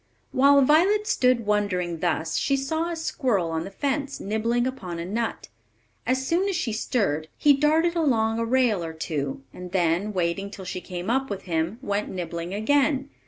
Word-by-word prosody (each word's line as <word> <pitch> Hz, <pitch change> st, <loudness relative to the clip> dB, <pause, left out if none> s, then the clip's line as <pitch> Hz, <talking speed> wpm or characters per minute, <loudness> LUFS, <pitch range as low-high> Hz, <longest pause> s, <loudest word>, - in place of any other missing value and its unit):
While 280 Hz, +1 st, +5 dB
Violet 370 Hz, +10 st, +4 dB
stood 250 Hz, -, +2 dB
wondering 185 Hz, -5 st, 0 dB
thus, 160 Hz, -2 st, -1 dB
she 275 Hz, -, +1 dB
saw 320 Hz, +5 st, -1 dB
a 340 Hz, -, -3 dB
squirrel 245 Hz, -, 0 dB
on 160 Hz, 0 st, -2 dB
the -, -, -6 dB
fence, 280 Hz, +6 st, -2 dB
nibbling 230 Hz, +4 st, 0 dB
upon 200 Hz, -10 st, -4 dB
a 170 Hz, -, -4 dB
nut. 225 Hz, +5 st, -3 dB, 0.6 s
As 260 Hz, +1 st, +1 dB
soon 360 Hz, +7 st, +1 dB
as 390 Hz, -, -1 dB
she 260 Hz, -11 st, -1 dB
stirred, 195 Hz, -, -1 dB
he 290 Hz, -, +5 dB
darted 315 Hz, +4 st, +2 dB
along 230 Hz, -8 st, +2 dB
a 230 Hz, -, 0 dB
rail 235 Hz, -6 st, +2 dB
or 165 Hz, -1 st, -5 dB
two, 145 Hz, -4 st, -3 dB
and 180 Hz, -1 st, -9 dB
then, 180 Hz, +3 st, +1 dB
waiting 185 Hz, +1 st, -1 dB
till 195 Hz, -2 st, -9 dB
she 185 Hz, 0 st, -4 dB
came 180 Hz, +3 st, -4 dB
up 270 Hz, +2 st, 0 dB
with 195 Hz, -1 st, -5 dB
him, 165 Hz, +3 st, -1 dB
went 205 Hz, -1 st, -1 dB
nibbling 170 Hz, -1 st, -5 dB
again. 270 Hz, +6 st, +1 dB
220 Hz, 180 wpm, -25 LUFS, 180-275 Hz, 0.6 s, While